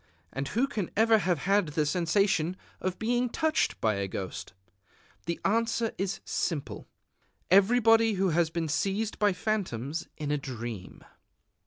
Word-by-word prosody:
And 135 +3 -3
who 240 - +1
can 215 -10 -3
ever 225 0 +5
have 180 -3 +1
had 195 +4 +2
the 150 0 0
sensation 175 +1 +1 0.2
of 185 0 -2
being 240 +2 0
touched 315 +4 0
by 100 -3 0
ghosts? 95 -1 -6 0.8
The 170 - -2
answer 225 +2 +1
is 195 +2 -2
simple: 155 -6 -3 0.6
_Everybody 225 +2 +5
who 190 0 +1
has 165 0 +2
been 165 0 -2
seized 200 +7 -1
by 205 -1 +4
phantoms 175 - -2
in 150 -2 -3
a 150 - +1
dream. 120 -7 -7
185 Hz, 140 wpm, -29 LUFS, 150-220 Hz, 0.8 s, ever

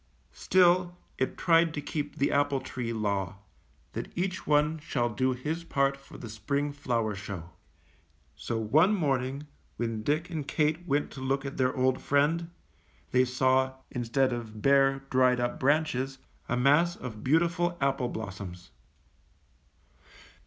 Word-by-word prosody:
Still, 180 -1 +3 0.2
it 130 - -1
tried 165 -1 +3
to - - -2
keep 145 0 -4
the 140 - +1
apple 140 -1 +2
tree 125 -2 -5
law, 100 -4 -2 0.3
— - - -36
that - - -5
each 185 +1 -2
one 150 +1 +3
shall 125 -5 -1
do 130 +4 0
his 150 +7 -4
part 140 -4 +1
for 135 0 -14
the 120 - -8
spring 140 +7 -2
flower 120 -6 -1
show. 95 -4 -7 0.8
So 115 -2 -3
onp 180 +8 +6
morning 135 -3 -1 0.3
when 115 -2 -2
Dick 155 +9 -1
and 155 -4 -4
Kate 160 +2 0
went 145 0 0
to 135 - -9
look 135 +1 -1
at 140 - -5
their 130 0 +1
old 130 0 +2
friend, 155 +4 +1 0.6
they 125 0 +4
saw, 130 +1 +2 0.2
instead 125 +2 +1
of 110 -3 -7
bare, 135 0 +4
dried 125 -1 +4
up 120 0 -2
branches, 135 -2 +1 0.3
a 125 - +1
mass 150 +7 +4
of 110 -4 -8
beautiful 170 +4 +2
apple 135 -3 0
blossoms. 95 -5 -7
135 Hz, 145 wpm, -29 LUFS, 120-150 Hz, 0.8 s, onp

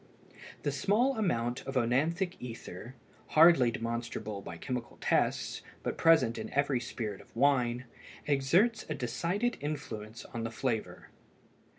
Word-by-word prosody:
The 145 - +1
small 210 - +2
amount 120 - 0
of 135 - -4
œnanthic 155 +10 +1
ether, 120 -1 -8 0.4
hardly 160 -6 +8
demonstrable 115 -3 -4
by 85 - -8
chemical 125 +5 -5
tests - - +1 0.2
but - - -2
present 130 -9 +4
in - - -6
every 140 -2 +2
spirit 110 -4 -5
of - - -21
wine, 125 -2 +2 0.4
exerts 170 - +3
a - - -1
decided 180 - -1
influence 115 -7 -5
on 115 - -6
the 115 - -2
flavor. 115 -1 -3
130 Hz, 125 wpm, -31 LUFS, 115-160 Hz, 0.4 s, hardly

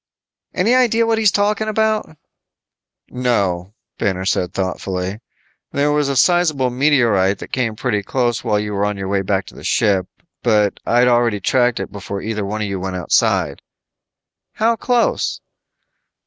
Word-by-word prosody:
"Any 215 +7 +2
idea 230 -3 +3
what 225 -1 +1
he's 215 -2 +5
talking 210 +2 0
about?" 215 -6 0 0.9
"No," 100 -7 -1 0.2
Banner 95 -2 -1
said 90 -2 0
thoughtfully. 95 +1 -3 0.5
"There 145 +1 +1
was 145 -1 +1
a 140 - -1
sizable 155 -4 +3
meteorite 120 -8 +2
that - - -10
came 120 -4 -1
pretty 110 -3 -1
close 120 +3 -1
while 105 -3 +1
you 105 0 -3
were 100 0 -1
on 105 -1 -3
your 95 -1 -4
way 100 -1 +1
back 95 0 -1
to - - -13
the - - -12
ship, 95 -4 +1 0.3
but 105 -4 +2
I'd 120 +1 +4
already 120 -3 +2
tracked 120 +3 +1
it - - -5
before 100 0 -6
either 110 0 -3
one 105 +2 -3
of - - -2
you 100 -1 -3
went 95 0 -4
outside." 90 - +1 0.9
"How 230 +1 +2
close?" 240 0 0
115 Hz, 160 wpm, -19 LUFS, 100-150 Hz, 0.9 s, he's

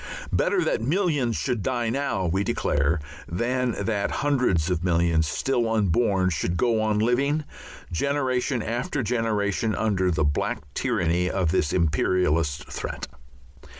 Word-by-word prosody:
Better - - +2
that - - 0
millions 145 - +1
should 125 -5 -1
die 120 0 -1
now, 125 -8 -1
we 95 +4 +1
declare, 75 -3 +1 0.3
than 120 +7 -1
that 105 -2 0
hundreds 125 - +1
of 90 -1 -1
millions 85 -3 +2
still 120 - 0
unborn 100 -2 +2
should 85 +2 -1
go 115 +3 +2
on 110 -1 +1
living, 135 +7 +1 0.5
generation 130 - 0
after 125 +5 -2
generation, 110 -2 0
under 95 -4 +1
the 80 -3 +1
black 75 0 -1
tyranny 90 -8 0
of 90 -4 0
this 75 - +1
imperialist 80 -2 +1
threat. - - -5
105 Hz, 130 wpm, -25 LUFS, 85-125 Hz, 0.5 s, Better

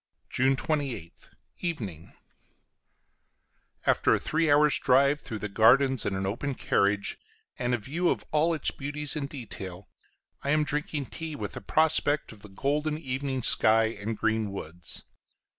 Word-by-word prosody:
June 135 +2 +3
28th, 140 - -3 0.3
Evening. 105 - -5 1.7
After - - +3
a - - -1
three 160 0 0
hours' 150 0 +5
drive 140 +3 +3
through 110 - -6
the 105 - -4
gardens 125 +5 +4
in 95 - -1
an 95 0 -2
open 125 +8 -2
carriage, 100 -2 0 0.4
and 125 0 +1
a - - -2
view 155 - -1
of - - -1
all 160 +2 +2
its 155 - +2
beauties 145 +1 -1
in 145 -2 -2
detail, 100 -9 -8 0.5
I 140 - -3
am 150 +1 +3
drinking 150 -1 -3
tea, 160 -2 -5
with - - -5
a - - -6
prospect 155 -1 +1
of 105 -3 -14
the 105 - -12
golden 150 +9 -1
evening 135 -3 -3
sky 110 +1 +4
and 110 +1 -3
green 110 -2 0
woods. 85 -2 -6
135 Hz, 150 wpm, -28 LUFS, 110-150 Hz, 1.7 s, hours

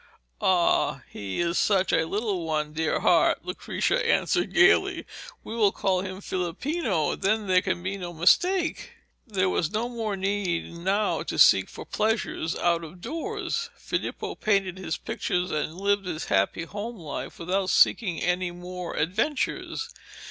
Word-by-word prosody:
'Ah, 180 -2 +2
he 100 -2 -5
is 170 0 +1
such 195 -2 +2
a 160 0 +2
little 200 -2 -1
one, 155 -1 -2
dear 160 0 0
heart,' - - +3
Lucrezia - - -1
answered 465 -1 +1
gaily. 380 +1 +4 0.4
'We 225 - -6
will 210 -4 +4
call 185 -2 0
him 190 0 -6
Filippino, 185 - -1
and - - -6
then 215 +2 +1
there 185 -1 +4
can 175 - -2
be 190 +1 -2
no 175 -1 -5
mistake.' 330 - +2 0.3
There 190 -4 +1
was 170 -3 0
no 220 +2 -1
more 225 -4 -3
need 190 -4 -1
now 190 +5 0
to - - -4
seek - - +6
for - - -9
pleasures 215 -6 -1
out 170 -1 +1
of 165 +3 -10
doors. 375 - -3
Filippo - - -3
painted 195 -3 0
his 180 -4 -3
pictures 180 +1 -2
and 155 +1 -2
lived 200 0 0
his 160 -3 -3
happy 100 +11 +2
home 210 +7 -6
life 155 -6 -6
without 185 +2 -1
seeking 180 -1 +3
any 180 0 0
more 180 0 -7
adventures. 235 - -1
185 Hz, 155 wpm, -26 LUFS, 170-215 Hz, 0.4 s, seek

